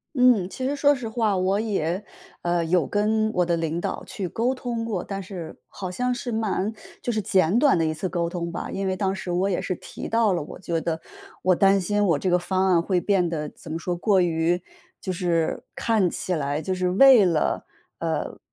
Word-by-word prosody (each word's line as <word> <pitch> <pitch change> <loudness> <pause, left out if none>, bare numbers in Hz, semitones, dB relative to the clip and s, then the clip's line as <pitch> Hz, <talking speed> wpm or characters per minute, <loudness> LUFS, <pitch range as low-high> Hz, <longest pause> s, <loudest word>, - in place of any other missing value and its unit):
嗯， 250 -8 +4
其 260 +6 -4
实 280 - 0
说 285 0 +4
实 250 -4 -5
话， 220 -3 +1
我 190 +2 +1
也， 195 -4 -1 0.4
呃， 175 -1 +1
有 165 -2 +2
跟 215 +1 +1
我 180 - +3
的 170 -1 +1
领 165 0 -2
导 - - -3
去 195 - -4
沟 240 +8 0
通 240 -3 -3
过。 210 -6 -3
但 195 -1 -5
是 180 -4 -8
好 185 -2 -6
像 250 +6 -1
是 245 0 -5
蛮 215 -2 -1 0.3
就 240 - -1
是 215 - 0
简 190 0 +2
短 275 - +4
的 165 - +2
一 155 - 0
次 155 +4 -3
沟 170 -2 -1
通 170 -1 -4
吧。 170 - -5
因 195 0 -3
为 190 0 0
当 190 -1 0
时 190 -1 -6
我 180 +3 +1
也 180 - 0
是 185 - -3
提 - - -8
到 225 -2 +3
了， 175 - -1
我 145 - -9
觉 170 -3 -2
得 165 0 -2 0.4
我 185 0 +4
担 195 +2 +4
心 205 +3 +1
我 165 -7 +3
这 185 - -1
个 180 - +4
方 185 +2 +1
案 170 -2 +4
会 180 0 +1
变 185 -2 +2
得 155 -3 -3
怎 160 - -13
么 160 - -2
说， 175 +2 -2
过 190 +2 +2
于 170 0 +1 0.4
就 185 - -3
是 170 -2 0
看 220 -5 +2
起 185 - -2
来 145 0 -1
就 190 - -1
是 185 0 0
为 235 +3 +7
了 165 -4 0 0.3
呃， - - -3
185 Hz, 240 characters per minute, -24 LUFS, 170-215 Hz, 0.4 s, 为